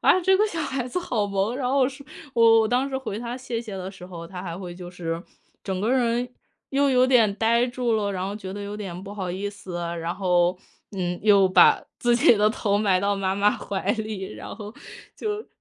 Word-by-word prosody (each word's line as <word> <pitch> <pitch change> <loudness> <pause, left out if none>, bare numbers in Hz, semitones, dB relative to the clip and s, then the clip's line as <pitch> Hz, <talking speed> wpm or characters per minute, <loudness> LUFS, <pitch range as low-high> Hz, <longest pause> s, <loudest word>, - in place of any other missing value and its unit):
啊， 370 - +5
这 380 +2 +4
个 420 - +3
小 335 -6 -4
孩 265 -3 -2
子 305 - -2
好 230 -11 -1
萌。 200 +3 -1
然 255 -2 -1
后 270 -2 +4
说 275 +1 -11 0.3
我 230 -1 +4
我 225 0 +7
我 220 - +1
当 255 +3 +1
时 265 - -3
回 220 -5 -5
他 240 +1 -5
谢 245 -3 -4
谢 215 -4 -7
的 185 0 -5
时 185 -2 -12
候， 170 -2 -8
他 180 +1 -8
还 170 -2 -5
会 175 -2 -7
就 175 -1 -9
是 170 -1 -4 0.4
整 190 -2 -3
个 220 +4 0
人 245 -1 +1 0.4
又 280 0 +2
有 255 0 +4
点 230 -6 +4
呆 230 +2 +3
住 245 -1 -1
了， 205 -2 +1
然 185 0 -3
后 200 - -4
觉 190 -3 -7
得 205 +1 -6
有 205 +1 -5
点 190 -4 -6
不 200 - -8
好 185 -3 -3
意 195 +3 -3
思。 195 -3 -8 0.2
然 165 +1 -2
后， 180 -1 +2 0.4
嗯， 175 -1 -2
又 200 -3 +5
把 185 - +6 0.2
自 240 -1 +3
己 240 - +6
的 210 +1 +4
头 205 -2 0
埋 195 -3 +3
到 200 +1 +1
妈 195 -1 -1
妈 205 +1 +4
怀 200 -1 -2
里， 215 -4 -4
然 - - -8
后 210 +1 -8 0.4
就 425 0 -3
210 Hz, 250 characters per minute, -24 LUFS, 190-245 Hz, 0.4 s, 我